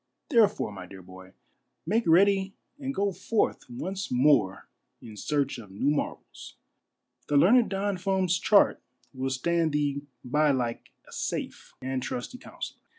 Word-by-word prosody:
Therefore, 215 - +3
my 95 -2 -9
dear 95 0 -12
boy, 95 +1 -13 0.5
make 220 +7 +1
ready 195 +3 +4 0.2
ai;d 270 -1 -3
go 200 -6 0
forth 215 - -1
once 185 +11 -5
more 125 -7 +3 0.3
in 110 -2 -11
search 140 +3 -1
of 105 -4 -11
new 105 +9 0
marvels. 150 - -5 0.7
The 145 - +2
learned 225 - +5
Don 195 0 -1
Fum's 185 -1 +1
chart 205 -2 +4 0.3
will 130 0 -2
stand 160 +4 0
thee 145 -1 0 0.2
by 150 +4 +2
like 125 -4 -1 0.2
a - - -16
safe - - -5
and 130 0 -2
trusty 125 - -5
counsellor. - - -8
150 Hz, 145 wpm, -27 LUFS, 125-195 Hz, 0.7 s, learned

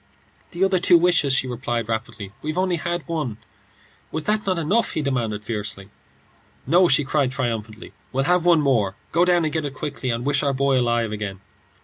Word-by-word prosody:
"The 175 +2 -2
other 190 -1 +3
two 175 0 +6
wishes," 170 -5 +3
she 135 - +2
replied, 120 -2 -3
rapidly. 110 -3 -4
"We've 155 +2 -4
only 185 -1 +1
had 170 +1 -3
one." 150 -10 -3 0.7
"Was 160 - -3
not 210 0 0
that 185 -2 0
enough?" 195 +9 +1
he 155 - -1
demanded, 115 -6 -2
fiercely. 105 -2 -5 0.8
"No," 180 +2 +5
she 140 -1 +4
cried, 140 -1 0
triumphantly; 115 -4 -4 0.2
"we'll 135 +1 0
have 180 +3 +2
one 170 -3 +5
more. 115 -9 +1 0.2
Go 170 +2 +3
down 175 -2 +3
and 155 - -2
get 160 -1 -1
it 140 -2 -5
quickly, 140 -3 -4
and 115 +1 -2
wish 140 -1 +2
our 140 -1 0
boy 135 0 +2
alive 120 -2 0
again." 105 -3 -5
140 Hz, 195 wpm, -22 LUFS, 115-170 Hz, 0.8 s, two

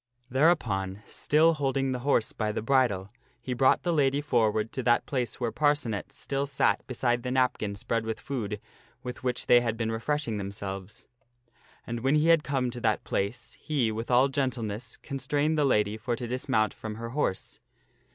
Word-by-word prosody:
Thereupon, 110 - +1
still 160 +3 +3
holding 135 -2 0
the 125 - -2
horse 120 -4 +1
by 110 -2 -1
the 105 - -3
bridle, 115 -7 +2 0.3
he 125 - -4
brought 130 +2 +3
the 175 -1 +1
lady 140 -2 +2
forward 110 -6 +1
to 130 - -3
that 120 -1 +3
place 125 -4 -2
where 120 -2 -1
Parcenet 145 -8 0
still 140 0 -3
sat 140 -2 +2
beside 120 -1 0
the 125 - -4
napkin 125 -5 +1
spread 115 +3 -2
with 110 -1 -4
food 110 -5 -4 0.4
with 125 0 -7
which 125 -1 -1
they 120 0 +6
had 115 -2 -1
been 115 -1 -1
refreshing 115 0 -1
themselves. 100 -1 -6 0.8
And 120 0 -4
when 135 +5 +2
he 155 +2 +3
had 165 -2 +5
come 130 -3 -1
to 120 - -7
that - - +1
place, 110 +4 -3
he, 135 -8 0
with 115 +2 -5
all 125 +2 +5
gentleness, 120 -5 -3
constrained 145 +2 -1
the 150 -2 +2
lady 105 -4 +2
for 120 +2 -2
to 120 - -5
dismount 115 -3 0
from 110 -1 -6
her 115 +1 -6
horse. 120 -7 -2
120 Hz, 180 wpm, -28 LUFS, 110-135 Hz, 0.8 s, they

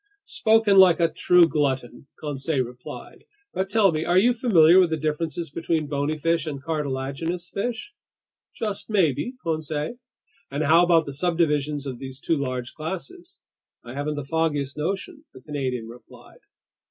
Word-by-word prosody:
"Spoken 220 -3 +3
like 180 -3 +7
a 165 -1 +3
true 180 0 +5
glutton," 135 -5 -2
Conseil 145 -1 -1
replied. 125 0 -10 0.3
"But 190 +1 -2
tell 205 -2 +4
me, 155 0 -2
are 175 +2 +2
you 240 +6 +5
familiar 185 -8 +5
with 180 -2 +4
the 160 - -1
differences 155 +1 -3
between 165 0 -1
bony 145 +2 -2
fish 165 +1 0
and 145 -3 -4
cartilaginous 155 +3 -3
fish?" 245 - -4 0.6
"Just 210 -2 -4
maybe, 190 - +1
Conseil." 155 +5 -3 0.5
"And 140 +3 -2
how 165 +4 +5
about 170 -2 +4
the 140 - -6
subdivisions 150 -3 0
of 130 -3 -6
these 130 -1 -8
two 165 +3 0
large 130 -3 -4
classes?" 345 - -7 0.4
"I 120 - -9
haven't 145 +2 -3
the 145 - -4
foggiest 145 -1 -1
notion," 200 - -4
the 130 - -12
Canadian 130 -5 -4
replied. 120 +2 -15
160 Hz, 155 wpm, -24 LUFS, 140-180 Hz, 0.6 s, like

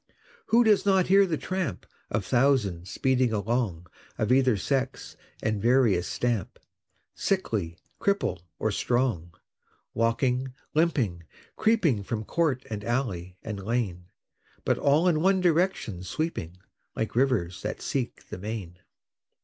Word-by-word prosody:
Who 235 +2 +5
does 215 -3 +4
not 190 -2 +3
hear 195 +1 +6
the 160 -3 -1
tramp 185 - -3 0.2
Of 105 -2 -1
thousands 105 -6 +2
speeding 130 -2 +1
along 105 -5 -1 0.3
Of 110 +2 0
either 130 -4 +4
sex 135 +5 -2 0.3
and 110 -2 0
various 115 -7 +3
stamp, 120 -6 -2 0.6
Sickly, 105 - -1 0.2
cripple, 200 - 0 0.2
or 110 - 0
strong, 110 -7 0 0.6
Walking, 125 +3 0 0.2
limping, 130 - +1 0.3
creeping 185 - +2
From 110 +2 -3
court 150 -5 0
and 105 -2 -5
alley, 100 -7 -2
and 100 -3 -5
lane, 100 -6 -2 0.6
But - - +1
all 150 +5 +3
in 155 -3 +3
one 190 +2 +4
direction 175 - +1
sweeping 90 - -3 0.4
Like 110 - -3
rivers 110 -9 +1
that 105 - -4
seek 130 -4 -3
the - - -6
main? 100 -4 -6
120 Hz, 125 wpm, -27 LUFS, 100-150 Hz, 0.6 s, hear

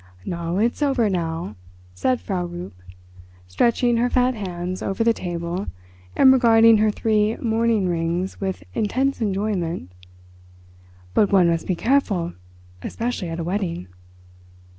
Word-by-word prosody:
"Na, 170 0 -3
it's 235 +7 0
over 265 -7 +2
now," 165 - -3 0.4
said 250 - 0
Frau 180 -3 -3
Rupp, 175 +1 -7 0.7
stretching 235 - +2
her 245 +1 +2
fat 250 0 +2
hands 185 -4 -5
over 195 +4 -1
the 230 0 +4
table 175 0 -4 0.5
and 265 -1 +7
regarding 230 -3 +6
her 215 0 +3
three 215 +1 +1
mourning 225 -3 +1
rings 170 +3 -2
with 190 -1 -3
intense 255 +5 0
enjoyment; 190 - -2 1.2
"but 205 - +3
one 190 -3 +5
must 165 -1 -1
be 185 - +1
careful, 200 -7 +1 0.5
especially 230 - -3
at 165 +1 -5
a - - -2
wedding." 170 - -3
195 Hz, 130 wpm, -22 LUFS, 175-230 Hz, 1.2 s, and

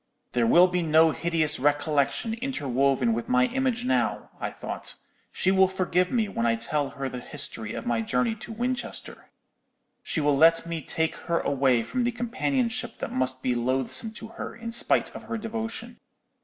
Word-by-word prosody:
"'There 120 -2 +2
will 175 +9 +7
be 180 -1 0
no 160 0 +5
hideous 160 -1 0
recollection 145 - +1
interwoven 140 - +1
with 115 +1 -3
my 125 0 +4
image 255 -2 0
now,' 255 - 0
I - - -2
thought; - - -4 0.4
'she 190 - +1
will 190 0 +5
forgive 185 -1 0
me 230 -4 +1
when 115 -12 -1
I 115 - +3
tell 140 +5 -1
her 135 0 -2
the 125 -1 -5
history 120 -5 -3
of 115 - -5
my 120 -1 +1
journey 125 - 0
to 220 +1 -9
Winchester. 245 +3 -4 0.7
She - - -2
will 145 -1 +3
let 165 +3 +5
me 170 -1 -4
take 160 +3 -1
her 170 - +2
away 130 -4 +2
from 250 - -2
the 240 - +1
companionship 245 0 -1
that - - -5
must 130 0 0
be 125 - +1
loathsome 130 - 0
to 225 0 -8
her, - - -7
in 230 0 -6
spite 235 - +1
of - - -8
her 225 - -3
devotion. 225 +1 -5
165 Hz, 180 wpm, -26 LUFS, -, 0.7 s, will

